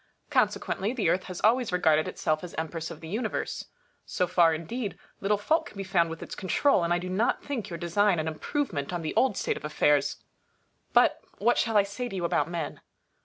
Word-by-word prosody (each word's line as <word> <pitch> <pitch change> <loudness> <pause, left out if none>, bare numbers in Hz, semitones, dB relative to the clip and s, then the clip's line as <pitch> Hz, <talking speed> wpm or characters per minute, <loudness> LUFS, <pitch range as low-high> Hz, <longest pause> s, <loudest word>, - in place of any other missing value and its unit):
Consequently, 205 +5 +1
the 220 -10 +1
Earth 185 +2 +1
has 185 -2 -6
always 235 +1 +3
regarded 160 -3 +3
itself 155 +1 -1
as 175 - -8
Empress 160 0 -3
of - - -9
the 160 - -8
Universe. 215 +9 -3 0.4
So 180 - 0
far, 175 -2 +4
indeed, 195 +8 -4 0.2
little 205 +1 +1
fault 315 +10 +1
can - - -13
be 195 - -3
found 175 -3 +2
with 165 0 -6
its - - -8
control, 195 +2 +2
and 170 - 0
I 175 - +4
do 180 +1 -5
not 190 +6 0
think 240 -8 -4
your 170 - -5
design 175 +3 +2
an 155 0 -1
improvement 160 - -2
on 175 -2 -3
the 155 - -2
old 255 -7 +2
state - - -1
of - - -10
affairs. 150 -1 +2 0.7
But - - +4 0.2
what 235 +4 +3
shall 225 -2 +2
I 205 - +6
say 220 +5 -5
to 195 - -6
you 180 -2 -1
about 170 - +1
men 170 -3 -4
180 Hz, 215 wpm, -28 LUFS, 165-210 Hz, 0.7 s, I